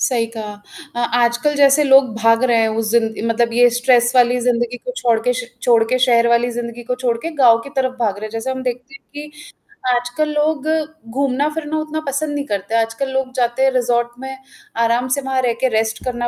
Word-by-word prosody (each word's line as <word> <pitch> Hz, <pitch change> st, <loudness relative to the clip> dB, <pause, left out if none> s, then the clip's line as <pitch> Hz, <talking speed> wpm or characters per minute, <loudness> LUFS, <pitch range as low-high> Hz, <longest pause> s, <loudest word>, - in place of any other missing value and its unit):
सही 235 Hz, -3 st, +1 dB
कहा। 210 Hz, -1 st, -5 dB, 0.4 s
अ 240 Hz, -, 0 dB
आजकल 240 Hz, +5 st, +1 dB
जैसे 285 Hz, +1 st, +4 dB
लोग 270 Hz, -3 st, +5 dB
भाग 230 Hz, +1 st, +3 dB
रहे 240 Hz, -2 st, +2 dB
हैं 225 Hz, -, +2 dB
उस 220 Hz, -1 st, -1 dB
ज़िन 225 Hz, -1 st, 0 dB
मतलब 230 Hz, 0 st, 0 dB
ये 245 Hz, +1 st, +5 dB
स्ट्रेस 245 Hz, -1 st, +3 dB
वाली 245 Hz, 0 st, +4 dB
ज़िंदगी 240 Hz, 0 st, 0 dB
को -, -, -7 dB
छोड़ 235 Hz, -2 st, +1 dB
के 250 Hz, +2 st, 0 dB
श 245 Hz, -, -8 dB, 0.2 s
छोड़ 235 Hz, -2 st, +4 dB
के 255 Hz, -, +2 dB
शहर 235 Hz, -2 st, +3 dB
वाली 235 Hz, +1 st, +2 dB
ज़िंदगी 235 Hz, 0 st, -6 dB
को 250 Hz, +1 st, -3 dB
छोड़ 250 Hz, -2 st, -1 dB
के, 330 Hz, +8 st, -5 dB
गाँव 250 Hz, -7 st, +4 dB
की 280 Hz, -, -10 dB
तरफ 260 Hz, -1 st, 0 dB
भाग 215 Hz, -5 st, 0 dB
रहे 215 Hz, -, -7 dB
हैं -, -, -10 dB
जैसे 225 Hz, +3 st, -4 dB
हम 260 Hz, 0 st, -4 dB
देखते 250 Hz, +4 st, -5 dB
हैं -, -, -14 dB
कि 295 Hz, +1 st, -8 dB, 0.7 s
आजकल 245 Hz, +6 st, -2 dB
लोग 300 Hz, -1 st, -1 dB, 0.4 s
घूमना-फिरना 290 Hz, +5 st, -2 dB
उतना 310 Hz, 0 st, -4 dB
पसंद 290 Hz, +2 st, -2 dB
नहीं 285 Hz, -1 st, -3 dB
करते 205 Hz, -1 st, -3 dB
हैं। 230 Hz, -, +4 dB
आजकल 230 Hz, +5 st, -5 dB
लोग 265 Hz, -1 st, -2 dB
जाते 245 Hz, +1 st, 0 dB
हैं 270 Hz, -, +4 dB
रिसॉर्ट 240 Hz, -1 st, 0 dB
में 265 Hz, 0 st, -7 dB, 0.5 s
आराम 235 Hz, +2 st, 0 dB
से -, -, -2 dB
वहाँ 265 Hz, -1 st, -1 dB
रह 245 Hz, -2 st, 0 dB
के 260 Hz, -, +3 dB
रेस्ट 220 Hz, 0 st, -2 dB
करना 240 Hz, -1 st, -2 dB
245 Hz, 220 wpm, -18 LUFS, 235-270 Hz, 0.7 s, लोग